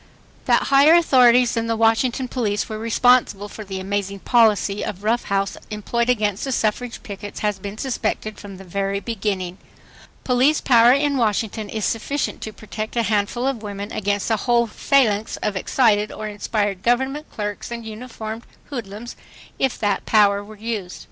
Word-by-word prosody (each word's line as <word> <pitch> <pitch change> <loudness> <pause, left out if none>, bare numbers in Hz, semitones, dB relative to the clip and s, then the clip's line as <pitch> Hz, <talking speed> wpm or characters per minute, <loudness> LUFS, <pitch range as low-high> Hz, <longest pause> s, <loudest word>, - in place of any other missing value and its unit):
That - - +3
higher 285 +4 +7
authorities 250 -7 +5
than 230 0 -1
the 230 - 0
Washington 225 +3 +2
police 215 -5 -1
were 215 -1 -5
responsible 230 -2 +3
for 215 +1 -9
the 190 -1 -6
amazing 200 0 -3
policy 210 -4 +3
of 200 -1 -5
rough 230 +3 +1
house 195 0 -1
employed 235 +3 -1
against 210 -5 +1
the 270 - -2
suffrage 235 +1 -1
pickets 205 -3 -8
has 210 -2 -1
been 200 +2 -7
suspected 220 -4 -3
from 200 -2 -10
the 195 - -11
very 195 +2 -2
beginning. 195 -5 -3 0.6
Police 260 +4 +3
power 235 -1 +6
in 280 +1 +2
Washington 220 -2 -1
is 215 -1 -2
sufficient 270 +5 -2
to 220 - -5
protect 215 +1 -7
a 235 - +2
handful 215 +3 0
of 270 -5 -1
women 205 -1 -6
against 205 +1 -1
a 220 - +3
whole 235 +2 +2
phalanx 220 -2 +1
of 210 - -1
excited 210 +1 +2
or 215 - -6
inspired 205 -2 -2
government 265 +6 0
clerks 205 -1 -5
and 235 -1 -6
uniformed 220 0 -7 0.3
hoodlums, 230 -2 -6 0.4
if 265 -2 +1
that 205 -2 -1
power 205 -2 +4
were 215 +1 -12
used.. 210 -4 -5
215 Hz, 165 wpm, -22 LUFS, 205-240 Hz, 0.6 s, higher